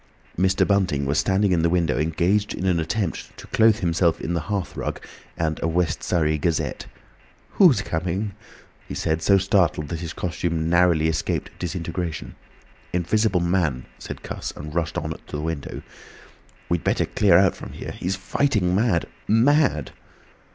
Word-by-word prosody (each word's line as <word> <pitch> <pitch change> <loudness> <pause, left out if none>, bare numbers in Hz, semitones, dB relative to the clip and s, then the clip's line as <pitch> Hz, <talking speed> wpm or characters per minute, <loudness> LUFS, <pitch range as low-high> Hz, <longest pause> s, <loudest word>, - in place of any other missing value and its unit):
Mr. 95 +1 +2
Bunting 90 -9 +1
was 70 +3 +1
standing 95 +1 +2
in 85 -2 +3
the 85 - +2
window 85 -7 +1
engaged 85 +7 +1
in 95 - -4
an 90 -3 +2
attempt 95 +2 -3
to - - -10
clothe 110 0 +3
himself 85 -1 +2
in 85 - -3
the 85 - 0
hearth 100 -3 -2
rug - - -3 0.4
and 80 -2 -1
a - - +1
West 85 -1 0
Surrey 80 -3 +1
Gazette. 85 +1 -1 0.6
"Who's 150 - +5
coming?" 90 +5 -2 0.6
he - - -6
said, 80 +1 -1
so 100 +4 +5
startled 95 -6 +1
that 85 - -3
his 85 -1 -5
costume 85 -2 -2
narrowly 85 -3 +4
escaped 80 0 -2
disintegration. 85 -2 -4 0.6
"Invisible 90 +2 +1
Man," 85 -8 0
said - - -8
Cuss, - - -5
and 75 +1 -8
rushed 80 -3 -1
on - - -3
to - - -8
the - - -2
window. 80 -2 -4 0.8
"We'd 85 -1 -1
better - - +1
clear 95 -5 +4
out 95 0 +4
from - - -9
here! - - -7
He's 95 +2 -3
fighting 100 -1 0
mad! 100 -4 +2 0.2
Mad!" 120 - +3
85 Hz, 160 wpm, -23 LUFS, 80-95 Hz, 0.8 s, Who's